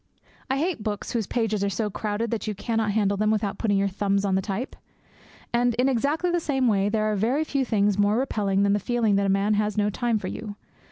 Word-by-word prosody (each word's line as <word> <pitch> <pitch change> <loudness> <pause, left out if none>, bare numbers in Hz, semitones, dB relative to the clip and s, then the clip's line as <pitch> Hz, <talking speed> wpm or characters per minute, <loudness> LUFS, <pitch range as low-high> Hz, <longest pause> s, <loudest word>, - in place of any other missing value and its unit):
I 265 - +1
hate 320 -3 -1
books 210 -1 -4
whose 225 -5 -1
pages 220 -4 -1
are 200 - +1
so 210 +2 -2
crowded 215 +2 -2
that 230 -1 -3
you 210 - -2
cannot 225 +1 -1
handle 200 -1 +1
them 215 +1 +1
without 210 -2 -1
putting 205 -3 +1
your 200 0 +2
thumbs 200 +1 0
on 195 - 0
the 190 - +2
type. 210 +6 -4 0.8
And, 240 0 +2
in 250 +3 +2
exactly 285 +7 +1
the 345 - +1
same 270 -5 0
way, 200 -2 +2
there 215 0 0
are - - 0
very 240 +9 +1
few 280 -3 -1
things 205 -4 +1
more 205 +2 +3
repelling 200 -6 0
than 200 0 +3
the 205 - +2
feeling 225 -1 +1
that 200 0 +1
a - - +1
man 195 +2 +2
has 210 0 0
no 210 0 +2
time 235 +1 0
for 190 - -5
you. 210 +1 -6
215 Hz, 240 wpm, -25 LUFS, 200-240 Hz, 0.8 s, more